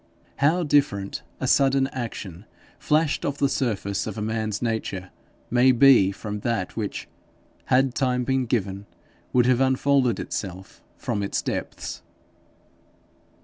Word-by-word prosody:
How 160 +6 +3
different 140 -10 +1 0.2
a - - -2
sudden 135 -1 +3
action 105 -7 -6 0.3
flashed 150 0 +1
off 140 0 -2
the 140 - +2
surface 105 -7 -1
of 110 - -5
a - - -3
man's 110 -1 -2
nature 110 -5 -3 0.4
may 125 +2 +5
be 120 -6 +6
from 105 +1 -6
that 115 -4 -2
which, 105 -3 -4 0.6
had 130 0 +3
time 125 -2 0
been 130 0 0
given, 100 -3 -2 0.4
would 125 -1 +4
have 125 0 +3
unfolded 130 -1 +2
itself 95 -1 -6 0.2
from 100 - -2
its 100 - -2
depths! - - -4
120 Hz, 130 wpm, -24 LUFS, 100-135 Hz, 0.6 s, be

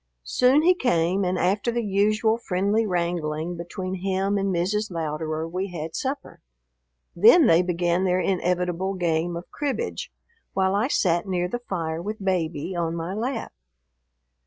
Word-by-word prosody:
Soon 255 - +3
he 360 +2 +6
came, 190 - +1
and 180 0 0
after 200 +6 +1
the 235 0 -1
usual 215 +2 +2
friendly 205 +2 0
wrangling 170 -2 -2
between 185 +2 -5
him 195 +1 0
and 195 -1 0
Mrs. 200 +5 0
Louderer 160 -1 -3
we 185 +4 -3
had 165 -3 -6
supper. 275 +1 -4 0.7
Then 235 - +7
they 165 -4 +5
began 175 0 0
their 185 -1 +2
inevitable 180 0 0
game 170 -1 0
of 175 - -10
cribbage, 295 - -3 0.4
while 190 0 +1
I 210 +5 +2
sat 175 - +1
near 180 -2 0
the 240 +7 -3
fire 165 -8 -3
with 210 +4 -4
Baby 175 -2 -1
on 170 -1 -1
my 170 +2 -4
lap. 230 +3 -3
185 Hz, 150 wpm, -24 LUFS, 170-205 Hz, 0.7 s, Then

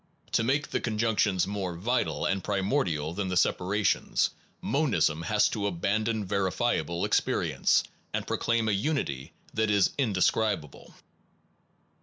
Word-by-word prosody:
To - - +2
make 140 +5 0
the - - -1
conjunctions 105 -4 +1
more 95 -3 -3
vital 120 +9 -1
and 95 -1 0
primordial 95 - 0
than 100 +1 -2
the 90 -1 -1
separations, 100 +4 +1 0.3
monism 90 - +1
has 105 +5 +2
to 100 -2 -2
abandon 105 +4 -1
verifiable 95 -3 0
experience - - +2 0.3
and - - -2
proclaim 115 -1 0
a - - +2
unity 100 - -2 0.2
that 110 0 +1
is 100 -2 +3
indescribable. 100 - 0
100 Hz, 120 wpm, -28 LUFS, 90-115 Hz, 0.3 s, is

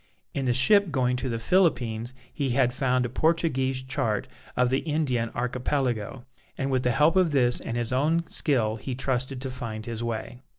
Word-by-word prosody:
In 135 - -2
the 125 - +2
ship 200 - +5
going 125 -4 +1
to 130 +1 -3
the 115 - -1
Philippines 120 -6 +1 0.2
he 140 -2 -1
had 125 -2 +3
found 130 -2 +1
a - - 0
Portuguese 135 -2 0
chart 130 -6 -1 0.3
of 125 0 +3
the 135 - +2
Indian 140 -7 -1
Archipelago, 125 -1 -2 0.3
and 135 0 -1
with 130 -1 +2
the 125 - +1
help 150 +8 +3
of 180 -5 +3
this 125 -3 +3
and 115 - -4
his 120 +1 -1
own 160 +6 +1
skill 115 -7 0
he 130 +2 -5
trusted 130 0 -2
to 130 -1 -3
find 115 -4 -6
his 115 -1 -4
way. 115 +1 -4
130 Hz, 185 wpm, -26 LUFS, 120-140 Hz, 0.3 s, ship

